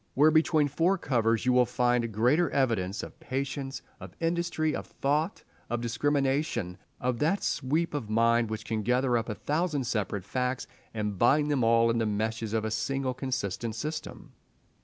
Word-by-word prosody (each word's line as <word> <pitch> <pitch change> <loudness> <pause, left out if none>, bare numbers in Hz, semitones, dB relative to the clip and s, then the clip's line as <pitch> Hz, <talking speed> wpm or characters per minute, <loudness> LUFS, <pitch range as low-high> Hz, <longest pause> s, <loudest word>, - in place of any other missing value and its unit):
Where 150 +3 +6
between 155 -1 +3
four 170 +7 +2
covers 115 - +1
will 125 0 +5
you 125 - +5
find 120 -1 +1
greater 125 +11 +3
evidence 110 -8 0
of - - -10
patience, 135 0 -4 0.2
of - - -10
industry, 165 -2 0
of - - -5
thought, 150 +7 -1 0.3
of 120 +1 -1
discrimination, 130 - 0 0.2
of 125 -1 -1
that 165 +7 +1
sweep 155 +6 0
of 125 -8 -3
mind 115 +1 +3
which 110 0 -5
can 110 -1 -2
gather 125 +3 +2
up 115 0 -1
a 105 - -2
thousand 150 - -1
separate 105 -5 -2
facts 125 +3 -2 0.3
and 105 -3 -3
bind 145 +5 +4
them 135 -4 +1
all 115 0 +4
in 115 - 0
the 110 - +1
meshes 110 +1 -2
of 110 -1 0
a 110 - -2
single 130 +4 -1
consistent 120 -4 -3
system? 155 +6 -6
125 Hz, 170 wpm, -28 LUFS, 115-145 Hz, 0.3 s, Where